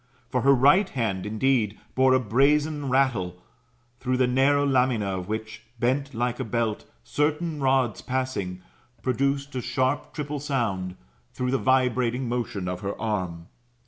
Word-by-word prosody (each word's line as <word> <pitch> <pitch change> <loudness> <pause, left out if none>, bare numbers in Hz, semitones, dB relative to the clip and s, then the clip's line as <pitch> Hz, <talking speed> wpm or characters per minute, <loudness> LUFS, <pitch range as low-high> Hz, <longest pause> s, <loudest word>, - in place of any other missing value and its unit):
For - - +1
her 140 0 +5
right 145 +10 +5
hand, 105 -7 -2
indeed, 110 -1 +1
bore 130 0 +4
a - - +4
brazen 145 +5 +2
rattle, 115 -10 +1 0.6
through 130 0 0
the 130 - +4
narrow 135 +3 +3
lamina 125 -5 +2
of 90 - -7
which 110 +1 -5 0.2
bent 135 +2 0
like 120 +2 -1
a - - -1
belt, 115 -2 -2 0.2
certain 150 - -1
rods 130 -5 +2
passing, 115 -9 -3 0.4
produced 140 +3 0
a 130 - -2
sharp 130 +3 -1
triple 150 -1 -4
sound, 110 -11 -2 0.4
through 125 0 -2
the 135 - +1
vibrating 125 -1 +1
motion 115 -6 -3
of 90 0 -3
her 100 +1 -5
arm. 90 -7 -3
125 Hz, 145 wpm, -26 LUFS, 110-135 Hz, 0.6 s, her